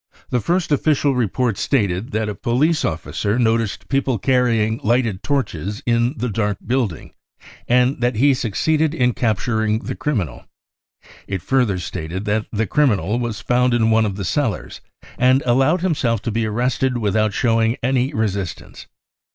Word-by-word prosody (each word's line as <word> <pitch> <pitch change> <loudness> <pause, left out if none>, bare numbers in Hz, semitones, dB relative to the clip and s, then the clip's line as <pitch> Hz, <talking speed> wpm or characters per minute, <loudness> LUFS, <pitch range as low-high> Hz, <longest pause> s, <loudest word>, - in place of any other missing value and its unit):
The 125 - +2
first 175 +2 0
official 145 -1 +2
report 120 -2 0
stated 100 -6 0
that 110 0 -1
a 105 - -2
policy 140 - +1
officer 100 +6 -2
noticed 115 -3 0
people 135 -3 0
carrying 115 -2 +1
lighted 115 -4 +1
torches 105 - -2
in 120 +3 +1
the 125 - -2
dark 105 -2 -1
building, 120 - -2 0.5
and 125 +1 +2
that 120 0 +1
he 140 +5 +4
succeeded 150 +7 0
1 155 - -5
ip 120 - -4
capturing 110 -1 0
the - - -4
criminal; 100 - -3 0.8
it 95 -3 -4
further 125 -8 +1
stated 90 +2 -5
that 105 +1 -1
the 110 0 0
criminal 115 - +1
was 120 -3 -3
found 125 0 +2
m 115 -1 +2
one 110 0 +3
of 100 - -4
the 100 -1 -4
cellars - - -2 0.4
and 130 +2 +4
allowed 135 +8 +3
himself 140 - 0
to 115 - -2
be 115 +1 -1
arrested 125 +3 0
without 110 -1 +1
showing 115 +2 +1
any 130 +1 +1
resistance. 100 - -4
115 Hz, 155 wpm, -20 LUFS, 105-130 Hz, 0.8 s, he